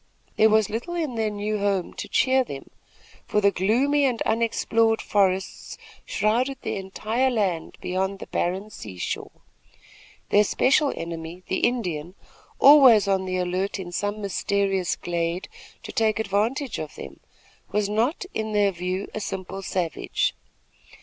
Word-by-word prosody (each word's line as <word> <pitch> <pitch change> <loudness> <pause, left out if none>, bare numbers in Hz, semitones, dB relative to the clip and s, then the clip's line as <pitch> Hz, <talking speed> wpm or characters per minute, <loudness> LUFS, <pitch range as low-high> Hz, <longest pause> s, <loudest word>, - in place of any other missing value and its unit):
There 220 - +5
was 215 -1 +4
little 240 +11 -4
in 315 -7 -2
their 220 -2 0
new 210 +1 -2
home 200 -3 0
to - - -6
cheer 260 0 +3
them; 140 - -9 0.6
for 210 - +2
the 200 -1 +4
gloomy 255 +11 +2
and 245 -4 0
unexplored 225 0 +1
forests 190 -2 0 0.3
shrouded 245 +6 +1
the - - -2
entire 215 +6 -1
land 195 -9 -1
beyond 190 +2 -1
the - - -8
barren 190 +5 -2
seashore. 95 - -5 1.0
Their 205 - +5
special 275 +7 +3
enemy, 165 +1 -6
the 190 - 0
Indian, 180 -8 -1 0.4
always 265 -8 +8
on 190 -1 +1
the 185 0 -2
alert 185 +3 -1
in 180 -2 -7
some 205 +4 -2
mysterious 195 -1 0
glade 170 +1 -2 0.4
to - - -7
take 220 -1 +1
advantage 220 +6 -1
of 155 -1 -6
them, 70 0 -9 0.5
was 210 0 +1
not, 230 - 0
in 220 0 -3
their 205 -1 +3
view, 185 +2 -3
a - - -3
simple 195 -1 -5
savage. 180 -3 -1
205 Hz, 145 wpm, -25 LUFS, 185-225 Hz, 1.0 s, always